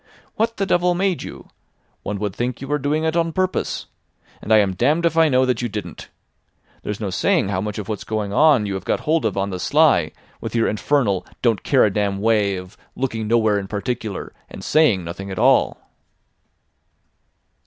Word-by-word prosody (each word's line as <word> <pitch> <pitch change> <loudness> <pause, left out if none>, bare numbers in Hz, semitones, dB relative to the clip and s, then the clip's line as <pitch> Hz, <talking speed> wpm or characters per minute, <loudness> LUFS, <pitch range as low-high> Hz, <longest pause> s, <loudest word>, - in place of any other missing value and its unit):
What 230 +1 -1
the 195 - 0
devil 175 -1 +2
made 185 -1 0
you? - - -9 0.5
One 105 - -4
would 100 -1 -3
think 120 0 -2
you 135 - -7
were 150 +1 0
doing 145 +3 0
it 160 0 0
on 165 -1 +1
purpose. 185 +1 -1 0.6
And 110 - -5
I 110 - +7
am 100 -3 +2
damned 150 - +1
if 165 -1 +1
I 165 -1 +5
know 130 -1 +3
that 125 -2 0
you 120 - -2
didn't. 100 -6 -7 0.7
There's 105 -1 -5
no 100 -4 -3
saying 90 +2 +1
how 95 -2 -1
much 105 +1 -4
of 105 -2 -5
what's 105 -3 -4
going 105 -2 -3
on 145 -4 +4
you 100 - -3
have 95 -1 -4
got - - -1
hold 160 +1 +1
of - - -1
on 100 +1 -1
the 90 - -4
sly 140 - +3 0.3
with - - -6
your 115 - +2
infernal 105 -3 +1 0.2
don't 115 -4 +2
care 135 - +3
a 100 - 0
damn 100 -1 0
way 105 -2 +2
of 90 0 -9 0.2
looking 115 -5 -2
nowhere 110 -2 +2
in 95 - -6
particular, 110 0 -4 0.2
and - - -10
saying 145 - +3
nothing 90 +4 -7
at 95 - -6
all. - - +3
110 Hz, 200 wpm, -21 LUFS, 100-150 Hz, 0.7 s, I